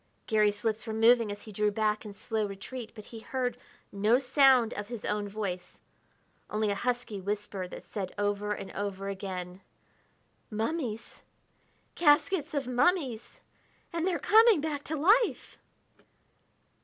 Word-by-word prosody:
Garry's 210 -1 +2
lips 220 0 -1
were 220 - -3
moving 230 -1 +5
as 205 - -8
he 215 - -10
drew 210 +1 +1
back 215 0 0
in 210 - -8
slow 215 +1 -2
retreat, 220 +4 -7
but 215 -2 -10
he 230 - -9
heard 250 +1 -2 0.4
no 210 +4 +3
sound 260 -3 +4
of 205 0 -5
his 235 -2 -6
own 210 -1 -1
voice, 195 -4 -5 0.7
only 215 -1 0
a - - +2
husky 240 -2 -2
whisper 200 -1 -3
that - - -10
said 195 -4 -5
over 205 0 -1
and 195 - -4
over 195 -1 -4
again: 185 -2 -6 0.9
"Mummies! 225 0 -3 0.7
Caskets 310 +1 +3
of 280 -2 0
mummies! 255 -1 0 0.5
And 335 +1 0
they're 360 -3 +1
coming 445 -3 +6
back 290 -1 -3
to 315 - -3
life!" 420 +10 +2
220 Hz, 145 wpm, -29 LUFS, 205-260 Hz, 0.9 s, coming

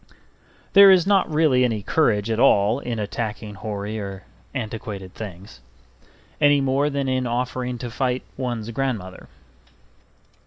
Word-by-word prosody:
There 200 0 +9
is 185 -3 +6
not 195 -2 +3
really 150 -5 +3
any 110 -5 0
courage 115 -4 +1
at 110 - -1
all 110 -2 +4
in 120 -4 -4
attacking 105 0 -4
hoary 105 +1 -5
or 100 -2 -7 0.3
antiquated 105 -6 -6
things, 95 - -10 0.8
any 145 -1 +5
more 135 +2 +1
than 140 -1 -2
in 130 -1 0
offering 125 +1 -2
to 120 0 -6
fight 125 0 -1
one's 120 -4 -4
grandmother. 110 -8 -4
120 Hz, 130 wpm, -23 LUFS, 105-135 Hz, 0.8 s, There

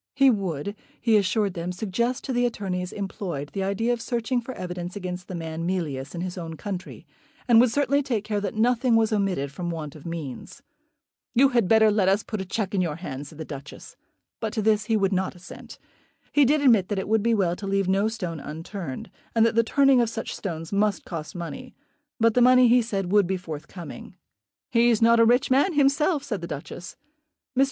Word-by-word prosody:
He 275 -1 +6
would, 195 - -3 0.2
he 230 -3 +3
assured 205 0 +2
them, 175 0 -4
suggest 225 +6 -2
to 265 - -3
the 245 0 +2
attorneys 185 -5 -3
employed 180 -7 -5
the 195 - -2
idea 200 +5 0
of 235 - -4
searching 240 +1 -1
for 235 - -7
evidence 180 -2 -6
against 180 -2 -5
the 185 - -6
man 165 -1 -5
Mealyus 150 -6 -3
in 170 - -4
his 185 0 -4
own 165 -1 -6
country, 185 +2 -6 0.4
and 235 -2 +7
would 250 - +4
certainly 285 +3 +2
take 240 -7 -2
care 210 -1 -2
that 200 0 -3
nothing 240 +2 +3
was 225 -1 +3
omitted 190 -9 0
from 175 +4 -5
want 160 -3 -5
of 155 +1 -10
means. 160 -7 -7 0.7
"You 270 +3 +6
had 235 -7 +2
better 220 0 +5
let 200 -3 +3
us 200 +3 +2
put 215 -4 -4
a - - -5
cheque 200 +1 -3
in 195 - +2
your 165 -4 -1
hands," 145 -5 -6
said 150 - -13
the 160 - -6
Duchess. 140 0 -10 0.4
But 220 -2 -3
to 220 -3 -1
this 215 -1 +2
he 220 0 +2
would 195 -1 +1
not 190 0 -1
assent. 180 0 -11 0.5
He 290 -1 +5
did 295 +3 +3
admit 225 -9 +5
that 205 - -1
it 190 - -2
would 220 +1 +2
be 230 +1 +2
well 180 -4 +1
to 195 - -7
leave 195 -1 +1
no 195 +3 +2
stone 180 -8 -4
unturned, 160 0 -7 0.2
and 225 0 +5
that 230 - +2
the 230 +1 +4
turning 275 +1 +4
of 235 - +1
such 225 0 -5
stones 165 -2 -5
must 205 0 +1
cost 160 -2 -6
money; 250 +10 -7 0.4
but 230 0 +4
the 250 - +3
money, 255 0 +7
he 245 +1 +5
said, 195 -5 -3
would 205 -3 +4
be 190 +1 -1
forthcoming. 170 0 -9 0.6
"He's 235 -1 +4
not 230 0 +5
a 230 - +7
rich 245 +4 +3
man 285 +8 +3
himself," 290 +2 +2
said 215 -10 -4
the 170 - -5
Duchess. 160 +5 -7 0.6
Mr. - - 0
200 Hz, 215 wpm, -25 LUFS, 180-235 Hz, 0.7 s, and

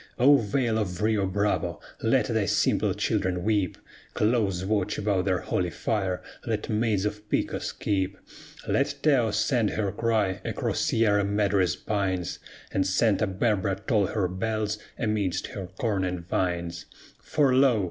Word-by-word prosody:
O 140 +4 +7
Vale 115 0 0
of 90 -5 -3
Rio 105 -3 +2
Bravo! 100 +2 0 0.2
Let - - +3
thy - - 0
simple - - +2
children 90 -1 0
weep; 105 -4 +1 0.4
Close 105 -5 +1
watch 100 -2 0
about 100 -3 0
their 95 -2 +1
holy 90 -1 -1
fire 95 +2 -2 0.2
let 110 -3 -3
maids 105 -3 +1
of 105 0 -4
Pecos - - -1
keep; 95 -1 -1 0.5
Let 140 +1 +1
Taos 125 -8 +3
send 120 -6 +2
her 100 -2 -1
cry 105 -3 0
across - - -2
Sierra 105 -3 +2
Madre's 100 -4 +1
pines, 95 -4 -2 0.3
And 95 0 +1
Santa 105 +2 +2
Barbara 95 -1 0
toll 105 -7 +2
her 100 -2 0
bells 105 +3 -2 0.2
amidst 105 -6 -1
her 95 -3 -6
corn 105 -5 0
and 90 -2 -3
vines; 85 -2 -2 0.3
For 145 -4 +2
lo! 130 -3 +4
105 Hz, 145 wpm, -27 LUFS, 95-110 Hz, 0.5 s, O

